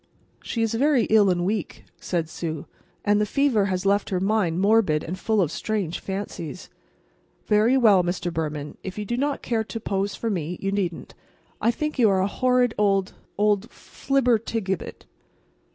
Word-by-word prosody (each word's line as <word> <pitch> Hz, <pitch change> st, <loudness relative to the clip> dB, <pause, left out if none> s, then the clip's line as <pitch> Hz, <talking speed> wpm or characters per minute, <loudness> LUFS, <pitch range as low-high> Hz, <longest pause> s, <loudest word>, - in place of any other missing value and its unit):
"She 230 Hz, -, -2 dB
is 225 Hz, -, 0 dB
very 270 Hz, +1 st, +3 dB
ill 210 Hz, -3 st, +6 dB
and 175 Hz, -1 st, +1 dB
weak," 205 Hz, -2 st, -3 dB, 0.2 s
said 170 Hz, -3 st, -2 dB
Sue, 160 Hz, -2 st, -5 dB, 0.4 s
"and 205 Hz, 0 st, +3 dB
the -, -, +2 dB
fever 255 Hz, -5 st, +2 dB
has 185 Hz, -1 st, -2 dB
left 200 Hz, +1 st, +2 dB
her 185 Hz, -, 0 dB
mind 190 Hz, -4 st, +1 dB
morbid 195 Hz, -6 st, +3 dB
and 175 Hz, -, -4 dB
full 220 Hz, -1 st, +1 dB
of 165 Hz, -4 st, 0 dB
strange 200 Hz, -4 st, -2 dB
fancies. 190 Hz, -4 st, -6 dB, 0.8 s
Very 220 Hz, +5 st, +4 dB
well, 210 Hz, -7 st, +5 dB
Mr. 175 Hz, 0 st, -2 dB
Behrman, 150 Hz, -2 st, -4 dB
if 190 Hz, +1 st, -6 dB
you 210 Hz, -, -3 dB
do 240 Hz, -, -2 dB
not 280 Hz, +3 st, -1 dB
care 225 Hz, -2 st, 0 dB
to 225 Hz, -, -6 dB
pose 200 Hz, -1 st, -2 dB
for 230 Hz, -, -2 dB
me, 175 Hz, -2 st, -3 dB
you 195 Hz, -, -2 dB
needn't. 185 Hz, -4 st, -3 dB, 0.5 s
But -, -, 0 dB
I -, -, +6 dB
think 300 Hz, +4 st, -2 dB
you 225 Hz, -3 st, +6 dB
are 190 Hz, -1 st, +2 dB
a -, -, +2 dB
horrid 250 Hz, +2 st, +2 dB
old—old 205 Hz, +1 st, 0 dB
flibbertigibbet." 230 Hz, -10 st, -1 dB
205 Hz, 170 wpm, -24 LUFS, 180-225 Hz, 0.8 s, ill